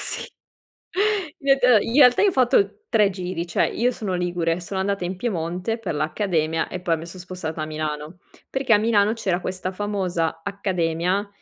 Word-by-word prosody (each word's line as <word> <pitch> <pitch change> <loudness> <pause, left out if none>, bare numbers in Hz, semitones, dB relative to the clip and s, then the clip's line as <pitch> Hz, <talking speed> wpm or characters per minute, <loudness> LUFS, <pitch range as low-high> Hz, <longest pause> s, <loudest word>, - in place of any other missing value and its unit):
Sì, - - -3 0.7
reta 285 - +3
in 230 - -3
realtà 250 -4 +7
io 415 - +5
ho 380 - +1
fatto 245 - +2
3 210 -3 +4
giri 180 -2 -4
cioè: 170 - +1
io 245 +2 +1
sono 205 -6 -3
ligure, 175 -1 -1
sono 190 +2 -4
andata 195 -1 -1
in 180 +2 -3
Piemonte 180 +1 -2
per 200 -8 -4
l'accademia 160 0 0
e 185 - -5
poi 170 -2 +1
mi 165 +2 -8
son 180 +1 -10
spostata 170 -3 -5
a - - -3
Milano. 155 +2 -4 0.3
Perché 265 -3 0
a 210 - +7
Milano 215 -1 +3
c'era 190 -6 -1
questa 185 0 -4
famosa 185 -5 -2
accademia 185 0 -1
185 Hz, 175 wpm, -23 LUFS, 170-220 Hz, 0.7 s, realtà